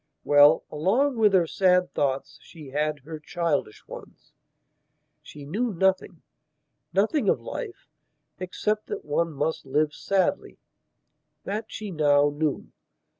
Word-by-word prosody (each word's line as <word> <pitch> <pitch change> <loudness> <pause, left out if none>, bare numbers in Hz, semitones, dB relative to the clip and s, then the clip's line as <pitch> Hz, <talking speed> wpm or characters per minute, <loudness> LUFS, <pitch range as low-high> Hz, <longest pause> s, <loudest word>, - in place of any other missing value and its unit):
Well, 145 +2 +6
along 230 - +1
with 210 -3 +4
her 180 -3 +4
sad 180 +1 +2
thoughts 135 -1 -2
she 155 -5 -13
had 150 +1 -1
her 155 +3 -8
childish 155 -8 -2
ones. - - -12 0.9
She 145 -1 -12
knew 220 +11 -2
nothingnothing 185 - -2
of - - +2
life, 445 -7 -7 0.5
except 210 +3 -2
that - - -6
one 165 +3 0
must 150 +2 -2
live 150 +3 0
sadly. 195 -1 -1 0.9
That 210 +3 -4
she 215 -2 -7
now 145 -3 +3
knew. 150 -1 -2
160 Hz, 120 wpm, -25 LUFS, 150-195 Hz, 0.9 s, Well